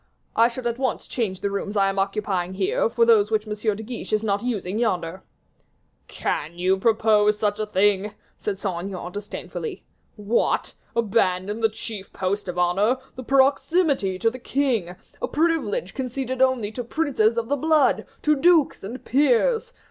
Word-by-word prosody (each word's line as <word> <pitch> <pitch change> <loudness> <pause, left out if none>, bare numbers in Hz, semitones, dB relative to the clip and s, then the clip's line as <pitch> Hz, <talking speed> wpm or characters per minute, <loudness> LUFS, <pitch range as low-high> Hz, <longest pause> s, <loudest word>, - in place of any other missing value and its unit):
"I 230 +1 +6
should 245 +1 -7
at 235 +1 -1
once 260 -1 -1
change 200 -7 -3
the 200 - -1
rooms 200 +1 -3
I 195 -1 +4
am 195 0 -1
occupying 195 -2 -1
here, 195 +3 +1
for 230 0 +3
those 215 -3 +5
which 215 -1 0
M. 215 - -4 0.2
de 220 - -7
Guiche 235 +1 -6
is 215 0 +2
not 200 -2 0
using 215 -4 -2
yonder." 185 -5 -1 0.9
"Can 160 +4 -3
you 185 +2 +2
suppose 215 -2 +3
such 210 0 0
a 215 - -1
thing?" 205 +1 +1 0.2
said 205 -2 -3
Saint 185 -3 -3
Aignan, 180 -2 -6
disdainfully. 205 - -6 0.3
"What! 210 +2 0 0.2
abandon 205 -2 +1
the 225 -1 +3
chief 215 -2 -7
post 195 +2 -2
of 180 0 -4
honor, 195 +8 +2 0.2
the 255 - -7
proximity 275 - +2
to 225 +4 +1
the 255 - -9
king, 240 -10 -1 0.3
a - - 0
privilege 300 - 0
conceded 260 0 -3
only 255 -5 +2
to 245 +2 -5
princes 235 -5 +1
of 230 -1 -1
the 285 - +1
blood, 310 +1 +2 0.2
to 300 0 +4
dukes, 320 - +3
and 235 +7 -7
peers! 295 - +2
215 Hz, 170 wpm, -24 LUFS, 195-255 Hz, 0.9 s, I